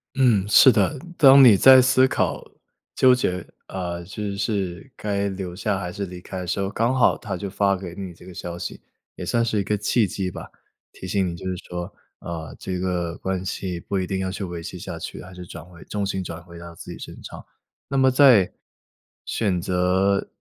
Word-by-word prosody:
嗯， 120 -8 +3
是 130 +5 +8
的。 105 +6 +1 0.2
当 135 -2 +8
你 120 -5 +9
在 130 +6 +8
思 130 +1 +4
考 - - -1 0.5
纠 130 -1 +6
结， 90 -8 -1 0.2
啊， 90 -2 -4
就 100 +2 -5
是 100 +1 -3
该 100 -1 -2
留 95 -2 -6
下 100 +1 -1
还 90 -2 -5
是 100 +1 -4
离 90 0 -9
开 95 +1 -7
的 90 - -6
时 95 - -1
候， 95 - 0
刚 115 +3 +1
好 125 - +4
她 100 -3 -5
就 100 - -5
发 100 0 +1
给 90 -2 -7
你 95 -2 -6
这 85 - -17
个 95 - -11
消 85 0 -6
息， - - -6 0.3
也 - - -7
算 115 0 +1
是 110 -2 0
一 - - 0
个 105 +2 -1
契 105 +2 +1
机 95 0 -3
吧。 - - -9 0.4
提 95 - -9
醒 95 0 0
你 85 - -4
就 85 - -10
是 95 - -2
说， 90 0 -4 0.4
啊， 80 -3 -6
这 90 -1 -4
个 90 -2 -2
关 95 -1 -3
系 90 -2 -4
不 95 +3 -3
一 90 - -2
定 95 - -2
要 95 0 -2
去 100 - -5
维 85 -2 -6
系 - - -7
下 - - -6
去， - - -7
还 95 - -12
是 90 0 -9
转 85 -1 -9
回 85 0 -15
重 105 -1 -3
心 95 -1 -2
转 85 -1 -7
回 85 0 -13
到 85 0 -10
自 85 - -10
己 - - -8
身 - - -10
上。 - - -10 0.4
那 140 - -4
么 130 -1 +5
在 130 -8 +6 0.7
选 95 -6 -1
择 95 +2 +1
95 Hz, 235 characters per minute, -23 LUFS, 90-105 Hz, 0.7 s, 你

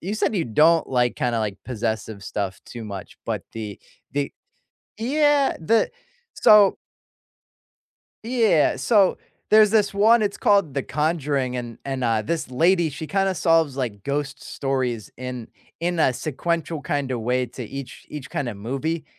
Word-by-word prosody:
You 195 +5 -3
said 215 0 0
you 170 - +1
don't 155 +8 +4
like 125 -2 +1
kinda, 120 -2 0
like, 105 -2 -3
possessive 110 -3 -3
stuff 95 -1 -4
too 120 -2 -8
much, 100 -3 -8
but - - -2
the 105 -3 -6 0.3
the 140 0 -2 0.7
Yeah, 290 +3 +2
the 220 +8 +2 0.4
So 210 -2 +6 1.5
yeah, 225 -9 +3
so 205 -5 +3 0.3
there's 215 -1 +7
this 210 -2 +2
one, 220 +3 +5
it's 205 -1 -1
called 200 -9 +2
The 140 - 0
Conjuring, 145 -4 -1
and 120 -2 -6
and, 135 -1 -3
uh, 115 -2 +1
this 155 +4 -3
lady, 170 +5 +3
she 150 +3 -6
kinda 195 +1 +1
solves, 165 -5 +2
like, 115 -7 -3
ghost 140 +1 -3
stories 130 -5 -2
in 125 -2 -6 0.3
in 175 0 -1
a 130 - +4
sequential 160 +4 -2
kinda 135 -2 -1
way 125 +2 0
to 125 +2 -8
each 135 +3 -8
each 145 -2 -7
kinda 120 -6 -3
movie, 135 +10 -3
140 Hz, 150 wpm, -23 LUFS, 120-180 Hz, 1.5 s, there's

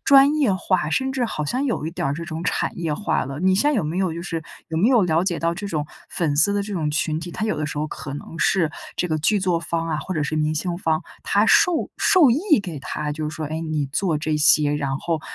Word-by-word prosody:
专 275 +1 +6
业 285 -9 +2
化， 185 -3 0
甚 265 +7 0
至 255 -2 0
好 155 -9 -3
像 255 - -1
有 230 - -1
一 - - -3
点 165 - -3
儿 140 - -1
这 170 +3 -5
种 160 0 -5
产 - - -1
业 165 -3 -1
化 205 - -1
了。 135 +2 -6
你 185 +1 +3
现 285 +10 +3
在 300 - 0
有 200 - 0
没 160 +4 -2
有 185 -4 0
就 170 - -5
是 165 -3 -4 0.3
有 160 - -2
没 205 +7 +4
有 245 -5 +5
了 165 -2 +2
解 175 -3 -1
到 170 0 0
这 200 +3 -5
种 155 -6 -2 0.2
粉 160 -4 -1
丝 185 +7 +4
的 205 - +1
这 205 - -6
种 160 -5 -1
群 155 +1 0
体， 175 +1 -7
它 215 - -3
有 215 - -1
的 155 - -2
时 150 - -5
候 155 - -1
可 140 -2 -7
能 160 +3 -8
是 170 -5 +2 0.3
这 180 - 0
个 155 -1 0
剧 205 +7 +2
作 180 -3 +1
方 165 0 -2
啊 155 -2 -1
或 185 +4 -4
者 155 - 0
是 155 +1 -2
明 155 0 +1
星 170 +3 -2
方， 160 -3 0 0.2
他 - - +2
授 355 -5 +3
授 335 -10 +5
意 305 - +3
给 170 -6 -6
它 150 +2 -4
就 150 0 -3
是 155 - -7
说： 155 +1 -4
“哎， 155 +2 -4
你 155 -3 -2
做 160 +4 0
这 155 0 -1
些， 150 -1 +4
然 140 -2 -1
后 165 -1 -2
165 Hz, 295 characters per minute, -22 LUFS, 155-200 Hz, 0.3 s, 专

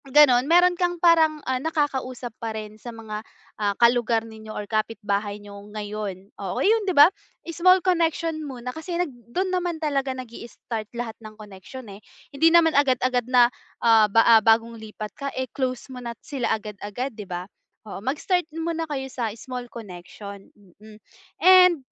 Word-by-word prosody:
Ganon, 270 -2 +5
meron 355 +1 +6
kang 350 0 -1
parang, 325 -3 +3
ah, 260 -1 -1
nakakausap 265 -6 -2
pa 225 -1 -4
rin 215 0 -9
sa 240 - -8
mga, 220 -2 -7 0.4
ah, 205 -1 0
ka-lugar 235 -1 +3
ninyo 220 -1 -12
or 210 -1 -5
kapitbahay 210 -1 -2
niyo 205 -1 -11
ngayon, 205 -2 -6
oo, 190 -2 -4
yun 445 +2 +3
di - - 0
ba? 290 - +11 0.4
Small 365 +3 +3
connection 330 -3 0
muna 250 -4 -6
kasi 340 +2 -5
nag 350 -6 -2 0.2
do'n 370 +8 -1
naman 355 -2 -1
talaga 285 -4 -1
nag-i-start 230 -2 -7
lahat 235 -2 -4
ng 215 -1 -11
connection 210 +4 -11
eh, 200 - -13 0.3
hindi 325 +4 +4
naman 330 -1 +5
agad-agad 255 -3 +2
na 245 -1 +5 0.3
ah, 220 -2 +6
ba 225 +1 +6
bagong 225 +1 +3
lipat 215 -1 -8
ka 280 0 -5 0.2
close 255 -2 -2
mo 250 - -8
na 235 -1 -6
sila 270 -4 -2
agad-agad 210 +4 -6
'di 210 -3 -10
ba? 175 0 -4 0.4
Oo, 200 -2 -8
mag-start 320 - -1
muna 325 -1 -3
kayo 270 -2 -3
sa 250 -3 -3
small 250 0 -7
connection. 200 -1 -10 0.3
Mm. 215 0 -14 0.4
And, 365 -2 +7
245 Hz, 160 wpm, -24 LUFS, 215-310 Hz, 0.4 s, ba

